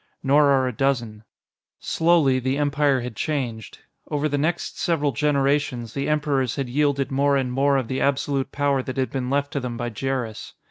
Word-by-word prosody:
Nor 145 Hz, +2 st, +4 dB
are 135 Hz, -2 st, +3 dB
a 125 Hz, -, -3 dB
dozen. 115 Hz, -4 st, -1 dB, 0.6 s
Slowly, 160 Hz, -6 st, +2 dB
the 130 Hz, +2 st, -1 dB
Empire 145 Hz, -2 st, +2 dB
had 120 Hz, -2 st, -6 dB
changed. 125 Hz, -8 st, -3 dB, 0.3 s
Over 150 Hz, +1 st, 0 dB
the 145 Hz, -, -1 dB
next 160 Hz, +4 st, -2 dB
several 150 Hz, -4 st, +1 dB
generations, 140 Hz, -3 st, 0 dB
the 140 Hz, +1 st, -2 dB
Emperors 140 Hz, -5 st, 0 dB
had 135 Hz, -3 st, -3 dB
yielded 140 Hz, 0 st, 0 dB
more 140 Hz, +1 st, +2 dB
and 130 Hz, -2 st, -1 dB
more 140 Hz, +2 st, +2 dB
of 130 Hz, -4 st, -2 dB
the 130 Hz, -, -2 dB
absolute 140 Hz, -1 st, 0 dB
power 140 Hz, -1 st, +1 dB
that 130 Hz, +1 st, -6 dB
had 130 Hz, -1 st, -1 dB
been 130 Hz, -2 st, -3 dB
left 140 Hz, +1 st, -1 dB
to 140 Hz, -, 0 dB
them 125 Hz, -3 st, -5 dB
by 120 Hz, 0 st, -3 dB
Jerris. 125 Hz, -1 st, -4 dB
135 Hz, 185 wpm, -23 LUFS, 130-145 Hz, 0.6 s, Nor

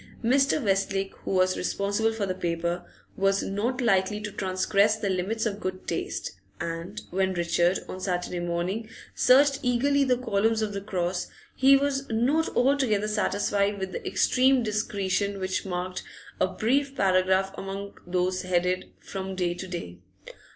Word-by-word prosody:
Mr. 275 Hz, +5 st, +3 dB
Westlake, 195 Hz, -1 st, 0 dB
who -, -, -3 dB
was 185 Hz, -1 st, +3 dB
responsible 200 Hz, +4 st, 0 dB
for 220 Hz, -2 st, -2 dB
the 185 Hz, -, -1 dB
paper, 170 Hz, 0 st, -2 dB, 0.3 s
was 195 Hz, 0 st, +2 dB
not 235 Hz, +6 st, -1 dB
likely 205 Hz, -2 st, +2 dB
to 210 Hz, 0 st, -5 dB
transgress 200 Hz, +2 st, +2 dB
the 210 Hz, -2 st, -2 dB
limits 200 Hz, +5 st, -1 dB
of 205 Hz, -2 st, -2 dB
good 185 Hz, -1 st, -5 dB
taste, -, -, -3 dB, 0.3 s
and 170 Hz, +5 st, -5 dB
when 190 Hz, +1 st, 0 dB
Richard, 175 Hz, +1 st, +2 dB
on 185 Hz, -, -6 dB
Saturday 180 Hz, -1 st, -2 dB
morning, 175 Hz, +6 st, -2 dB, 0.2 s
searched 275 Hz, +2 st, +5 dB
eagerly 275 Hz, +3 st, +2 dB
the 255 Hz, -2 st, +2 dB
columns 225 Hz, -2 st, +1 dB
of 210 Hz, -1 st, -2 dB
the 200 Hz, -, -3 dB
'Cross,' 185 Hz, -3 st, -2 dB, 0.3 s
he 275 Hz, +1 st, +6 dB
was 275 Hz, 0 st, -1 dB
not 260 Hz, +9 st, +2 dB
altogether 250 Hz, -6 st, +2 dB
satisfied 205 Hz, -1 st, 0 dB
with 190 Hz, -1 st, -4 dB
the -, -, -5 dB
extreme 260 Hz, 0 st, +3 dB
discretion 200 Hz, -2 st, -1 dB
which 190 Hz, +1 st, -2 dB
marked 180 Hz, 0 st, -3 dB, 0.4 s
a -, -, +3 dB
brief 275 Hz, +5 st, 0 dB
paragraph 190 Hz, -1 st, +2 dB
among 195 Hz, +1 st, -6 dB
those 185 Hz, +1 st, 0 dB
headed: 180 Hz, 0 st, 0 dB
'From 190 Hz, -1 st, -6 dB
Day 180 Hz, -2 st, 0 dB
to 190 Hz, +2 st, -7 dB
Day. 130 Hz, -, -6 dB
200 Hz, 150 wpm, -27 LUFS, 185-225 Hz, 0.4 s, he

